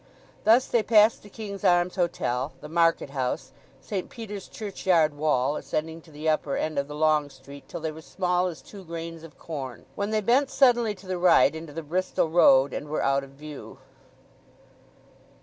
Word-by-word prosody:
Thus 235 +4 +6
they 235 - +1
passed 215 0 +4
the 205 - -14
King's 200 -2 -7
Arms 175 0 +3
Hotel, 145 -7 -1
the 150 - -9
Market 165 -3 +1
House, 130 -1 -3 0.3
St. 195 -4 -4
Peter's 210 -4 -8
churchyard 185 -7 +1
wall, 145 -2 +1
ascending 160 +1 -4
to 160 - -19
the 155 +1 -6
upper 155 -2 +1
end 155 -2 -1
of 140 - -2
the 150 - -8
long 155 -1 +2
street 140 0 -14
till - - -6
they 160 0 -2
were 160 +1 -11
small 180 +1 0
as 160 -7 -7
two 200 +4 -12
grains 165 -1 -7
of 165 -1 -13
corn; 135 -7 -7
when 200 +1 -3
they 215 0 +1
bent 255 +6 +3
suddenly 240 -6 +3
to 190 - -16
the 185 -1 -3
right 175 -3 +5
into 160 -1 -8
the 165 +2 -6
Bristol 175 +1 -1
Road, 135 -5 +5
and 145 - -5
were 155 - -1
out 140 0 +2
of 135 - -11
view. 145 +2 -10
165 Hz, 185 wpm, -26 LUFS, 145-190 Hz, 0.3 s, Thus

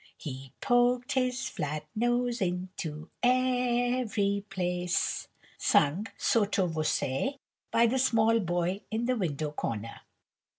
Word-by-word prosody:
"'He 135 -3 -7
poked 245 0 +3
his 260 0 0
flat 150 - -4
nose 240 +1 +1
into 180 -4 -3
every 245 -5 +2
place;'" 180 -2 -1 0.3
sung, 165 +10 +3
sotto 205 -4 +2
voce, 160 - -1 0.3
by 230 - +4
the 255 +3 +2
small 230 -3 +4
boy 175 +1 -1
in 225 +2 -1
the 255 +1 +1
window 155 - -2
corner. 115 -6 -4
205 Hz, 110 wpm, -29 LUFS, 170-245 Hz, 0.3 s, by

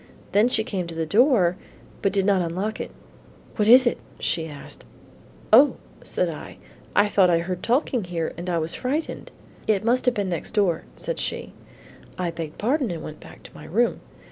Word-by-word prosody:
Then 210 +4 +4
she 220 -3 +2
came 195 -7 -3
to 165 - -7
the 165 0 -1
door, 200 - +4 0.4
but 195 - +2
did 195 -2 +1
not 195 -2 +3
unlock 185 +6 -2
it. - - -4 0.7
'What 210 -2 +2
is 255 +3 +9
it?' 240 - +1 0.2
she 160 -1 0
asked. 145 -2 -9 0.7
'O,' 275 +6 +8 0.3
said - - 0
I, - - -7 0.4
'I 205 - +5
thought 195 -3 +4
I 170 - +4
heard 180 +1 -3
talking 245 -3 +1
here 170 -2 -3
and 175 +2 -5
I 175 - +1
was 160 0 -2
frightened,' 290 +6 -3 0.4
'It 215 -1 +1
must 250 +2 +2
have 250 - +3
been 200 -2 -1
next 170 +4 -3
door,' 185 -6 +1
said - - -3
she. - - -3 0.6
I 180 -2 -1
begged 165 -2 -6
pardon 260 +3 0
and 170 -2 -5
went 155 - -8
back - - -14
to - - -14
my 150 - -11
room. 225 +10 +1
195 Hz, 195 wpm, -24 LUFS, 170-235 Hz, 0.7 s, is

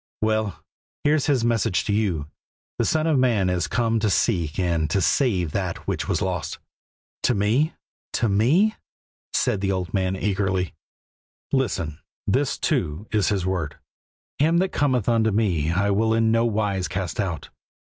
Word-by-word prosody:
"Well, 110 -2 0 0.4
here's 150 0 +2
His 130 -6 +2
message 115 -4 +1
to 105 - 0
you: 95 -9 0 0.5
'The - - +2
Son 155 0 +1
of 155 -4 +3
Man 110 -8 +2
is 90 -1 0
come 115 +2 +1
to 105 -1 +1
seek 85 -6 +1
and 85 -4 0
to 95 - +1
save 95 - +1
that - - -3
which - - -2
was - - 0
lost.'" - - -3 0.6
"To 125 - +2
me? 115 +10 +1 0.4
To 120 - +1
me?" 135 - +3 0.6
said 100 - +1
the 100 -1 +1
old 90 -2 -3
man 95 -1 0
eagerly. 95 -2 -1 0.8
"Listen; 95 - -1 0.3
this, - - +1
too, 75 +8 -1
is 105 -3 +2
His 95 -3 0
word: 90 -6 -2 0.6
'Him 160 +4 +3
that 185 +2 +2
cometh 130 - +1
unto 115 -2 +3
Me 95 -8 +1
I 100 +3 +1
will 110 +3 +2
in 115 0 +3
no 115 +1 +3
wise 105 -4 0
cast 95 -2 -4
out.' 90 -7 -2
105 Hz, 160 wpm, -24 LUFS, 95-115 Hz, 0.8 s, of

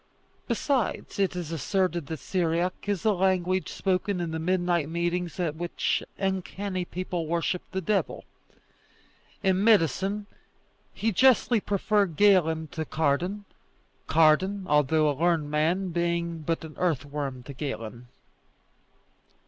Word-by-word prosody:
Besides, 245 -2 -1
it 195 -2 +1
is 175 -3 -4
asserted 170 0 -1
that 160 - -4
Syriac 175 +3 0 0.2
is 200 -2 -1
the 215 -1 +3
language 185 -1 +1
spoken 190 0 -1
in 170 -2 -2
the 160 - -3
midnight 175 -2 +1
meetings 170 -1 -2
at 165 -4 -1
which 175 +2 -1 0.2
uncanny 190 -1 -2
people 175 -2 -4
worship 170 +2 0
the 190 - -2
devil. 200 +3 -1 1.2
In 190 0 +2
medicine 200 - +3 0.7
he 225 - -1
justly 245 +2 +4
preferred 200 -3 +1
Galen 165 -5 +4
to 160 - -4
Cardan; 165 +7 -1 0.6
Cardan, 175 +5 +3
although 150 +1 +3
a 145 - +2
learned 160 0 +1
man, 170 +5 +1
being 170 -1 -1
but 165 +2 -2
an 155 - -10
earthworm 145 -5 -2
to 140 - -9
Galen. 125 -4 -6
175 Hz, 125 wpm, -27 LUFS, 160-190 Hz, 1.2 s, justly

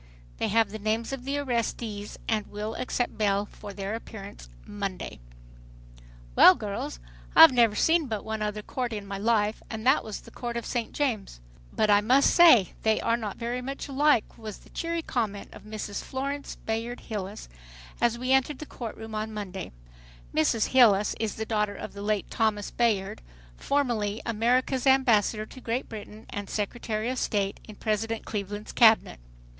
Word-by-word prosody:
They - - +1
have 225 -1 +2
the 215 - -6
names 220 +4 -1
of 260 -2 -6
the 280 +1 -1
arrestees 230 -5 -3
and 215 -2 0
will 210 +2 -5
accept 245 -1 -2
bail 200 -1 +2
for 205 0 -10
their 195 +1 -4
appearance 200 - -8 0.2
Monday. 200 - -5 1.2
"Well 185 - +9
girls, 200 - -5 0.4
I've 325 - +11
never 235 -4 +4
seen 320 +4 +3
but 215 -4 -4
one 220 0 -3
other 210 0 -2
court 245 0 -3
in 205 -2 -5
my 195 0 -5
life 215 0 +1
and 220 0 -6
that 265 +3 +4
was 215 -2 -6
the - - -15
Court 240 -1 -4
of 235 - -4
St. 240 -3 -2
James. 225 - -2 0.3
But 215 - +2
I 205 0 +6
must 255 +6 +4
say 285 - +7
they 220 -1 +2
are 230 - +1
not 215 -4 -5
very 240 +1 -3
much 275 +3 -5
alike," 280 -4 +2
was 215 -3 -7
the - - -20
cheery 335 0 -2
comment 215 -8 -3
of - - -13
Mrs. 215 -1 -5
Florence 280 +2 -4
Bayard 225 +2 -4
Hilles, 205 -2 -6 0.5
as 235 0 +2
we 255 +2 -2
entered 265 +1 +3
the 310 - -7
court 235 -6 -7
room 220 0 -8
on 215 +1 -3
Monday. 195 -4 -6 0.6
Mrs. 215 +8 +2
Hilles 215 -6 +5
is 220 -1 -2
the 220 - -3
daughter 210 -2 0
of - - -7
the 200 - -8
late 210 -1 -1
Thomas 215 -3 0
Bayard, 210 - 0 0.3
formerly 225 - 0
America's 250 +4 +1
ambassador 230 -5 +3
to 255 - -13
Great 240 +3 -2
Britain, 215 0 -9
and 205 -2 -5
Secretary 215 +1 -2
of 255 - -2
State 200 -2 -1
in 215 - -10
President 220 +1 -2
Cleveland's 205 0 -5
cabinet. 220 - +5
220 Hz, 175 wpm, -27 LUFS, 205-245 Hz, 1.2 s, I've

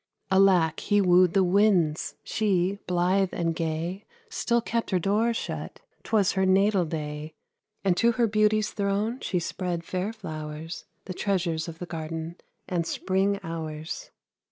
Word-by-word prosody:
Alack! 185 -5 +4
he 205 - +2
wooed 180 -2 +5
the 195 - +5
winds; 180 -5 +2
she, 195 -2 0
blithe 180 +2 +2
and 165 -1 0
gay, 165 +4 -3 0.3
Still 235 - +1
kept 230 0 -2
her 190 - +2
door 210 +6 +2
shut, 230 - -5 0.2
'twas 210 -4 +2
her 190 - 0
natal 190 0 +3
day; 150 -1 -5 0.5
And 190 -3 +3
to 235 +3 +4
her 235 +1 +2
beauty's 215 0 +2
throne 205 +4 -1
she 185 - -2
spread 175 0 -3
fair 185 +4 -2
flowers, 155 -5 -7 0.2
The 185 - -5
treasures 175 -5 -1
of 165 -1 -7
the 180 - -6
garden, 165 0 -5 0.3
and 170 -2 -1
spring 195 +1 0
hours. 160 -1 -5
185 Hz, 145 wpm, -27 LUFS, 165-200 Hz, 0.5 s, wooed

